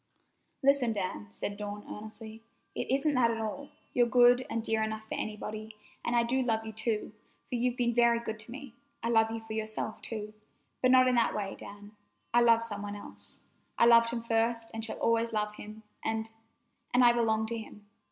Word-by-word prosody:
"Listen, 270 -4 +4
Dan," 185 - -3
said 200 - -5
Dawn 205 0 -6
earnestly. 220 +1 -9 0.3
"It - - -4
isn't 275 +3 +2
that 250 -3 +4
at 230 - -1
all. 225 +6 -4 0.2
You're 240 -1 +4
good 245 +1 +5
and 230 -1 -2
dear 220 -1 +1
enough 220 0 -2
for - - -5
anybody, 215 0 -5 0.3
and 240 - 0
I 235 - +4
do 255 +3 +1
love 225 -3 0
you, 220 - -6
too, 220 -1 -2 0.3
for - - -9
you've 245 0 0
been 240 -1 +1
very 235 0 +4
good 220 -2 -5
to 225 +2 -7
me. 270 -2 -9 0.3
I 230 - 0
love 225 -1 +4
you 225 0 -4
for 225 0 -8
yourself, 220 0 -4
too, 215 -2 -5 0.5
but 255 - +4
not 255 0 +6
in 255 - +3
that 235 -2 +2
way, 200 -2 -3
Dan, 205 +1 -11
for 210 - -31 0.4
I - - +7
love 230 -1 +5
some 205 -3 -5
one 205 0 -5
else. 205 - -7 0.4
I - - +5
loved 230 0 +7
him 235 -1 -3
first 230 0 0
and 225 0 -4
shall 225 - -3
always 230 0 +1
love 210 -1 0
him, 215 +1 -10 0.2
and—and—I 225 +2 0
belong 220 -2 +1
to 230 +1 -3
him. 210 -1 -11
225 Hz, 200 wpm, -30 LUFS, 215-235 Hz, 0.5 s, I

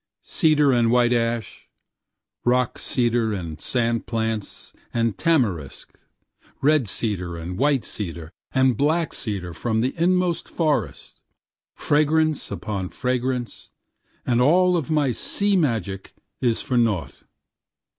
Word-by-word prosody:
Cedar 150 -5 +3
and 120 -2 +3
white 120 0 +3
ash, 115 -2 -2 0.7
rock 125 0 +1
cedar 120 -3 0
and 85 -5 -6
sand 115 -2 0
plants 110 -2 -3 0.2
and 115 -3 0
tamarisk 105 - -1 0.6
red 145 -4 +3
cedar 90 -5 -1
and 85 +2 -6
white 140 +2 +1
cedar 85 -5 -5 0.2
and 130 -2 +3
black 155 +6 +1
cedar 95 -7 -4
from 110 +6 -1
the 130 +3 0
inmost 180 0 +1
forest, 155 -3 -2 0.5
fragrance 155 +1 +1
upon 100 -4 -4
fragrance 125 -1 -3 0.6
and 125 -1 +2
all 180 +6 +4
of 165 -3 -2
my 150 -4 +2
sea 200 - +1
magic 110 - -1 0.3
is 120 -3 +1
for 125 -2 +1
nought. 100 - -1
120 Hz, 115 wpm, -23 LUFS, 105-145 Hz, 0.7 s, all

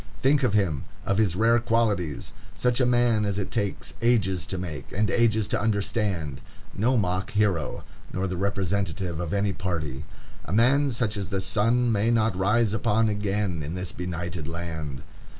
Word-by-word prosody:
Think 140 +2 +4
of 125 -6 +2
him,—of 95 +1 -1
his 100 -5 +2
rare 115 +4 +4
qualities!—such 115 - -1
a 125 - +3
man 120 -3 +3
as 100 -2 -1
it 100 +1 -3
takes 105 -4 -2
ages 105 -6 +2
to 95 - -3
make, 80 -7 -6
and 105 0 0
ages 110 -3 +2
to - - 0
understand; 100 - -1 0.3
no 125 +5 +2
mock 95 -2 0
hero, 100 -7 0 0.3
nor 95 +1 -1
the 90 - -3
representative 95 -2 -1
of 85 -2 -3
any 100 0 +1
party. 80 -7 -3 0.4
A - - -6
man 135 +6 +4
such 115 -3 -1
as 100 -2 -3
the 100 -1 -1
sun 115 +5 +2
may 110 +1 +2
not 110 -3 +2
rise 105 +3 +2
upon 110 0 +2
again 100 -4 -1
in 75 +4 -4
this 90 -1 -4
benighted 85 -2 -4
land. 80 -4 -5
100 Hz, 165 wpm, -26 LUFS, 90-115 Hz, 0.4 s, Think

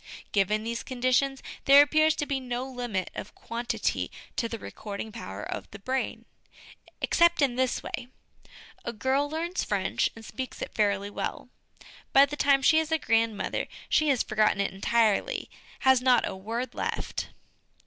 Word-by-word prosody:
Given 210 +2 +2
these 230 +1 -3
conditions, 255 +1 0 0.2
there 280 +1 +9
appears 310 +1 +3
to 295 - -2
be 280 -2 -1
no 250 0 -3
limit 245 -8 -3
of - - -7
quantity 235 +1 -2 0.3
to 230 - -1
the 230 - -4
recording 210 0 -7
power 230 - -7
of - - -5
the - - -9
brain. 260 +6 -3 0.8
Except 340 0 +4
in 270 -4 +3
this 260 0 0
way: 245 - -5 0.8
a 235 - -4
girl 265 +6 +1
learns 335 +4 -2
French, - - 0
and 225 -1 -11
speaks 260 +3 -6
it - - -5
fairly 200 -1 +1
well; - - -4 0.6
by 275 +1 +8
the 285 +1 -6
time 275 -1 +3
she 315 +4 +6
is 320 0 -2
a 320 - +4
grand 225 -5 +1
mother - - -2 0.2
she 310 -1 +3
has 265 -4 +3
forgotten 215 -2 +2
it 200 - 0
entirely, 230 - +1 0.3
has 265 -1 +5
not 255 -1 +4
a - - -4
word 230 +6 -4
left. - - -3
250 Hz, 165 wpm, -28 LUFS, 220-275 Hz, 0.8 s, there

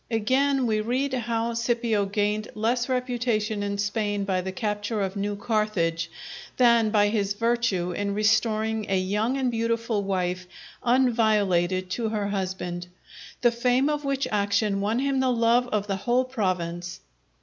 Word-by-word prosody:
Again, 260 +4 +2
we 215 -2 +1
read 260 +5 -1
how 235 -1 -1
Scipio 230 -3 0
gained 210 +1 -1
less 240 +4 0
reputation 240 -4 -1
in 200 0 -2
Spain 205 0 -1
by 190 -2 0
the 190 +1 -4
capture 210 +2 -2
of 195 0 -2
New 205 +1 -2
Carthage, 200 -7 -1 0.5
than 235 -3 +5
by 205 -1 +3
his 205 -2 0
virtue 230 -5 0
in 200 +2 -2
restoring 215 0 +1
a 195 - +2
young 210 +7 0
and 260 -2 0
beautiful 230 -1 -1
wife 185 -2 -2 0.4
unviolated 210 -8 +2
to 225 +2 -1
her 210 -2 -2
husband; 185 -3 -3 0.5
the 240 - +4
fame 250 +4 +2
of 295 0 -2
which 275 -1 -1
action 200 -1 +1
won 215 +3 0
him 275 +1 +1
the 260 -1 +2
love 235 +1 +3
of 210 -4 -1
the 195 -2 -2
whole 245 +5 +1
province. 180 -6 -3
215 Hz, 150 wpm, -25 LUFS, 200-240 Hz, 0.5 s, than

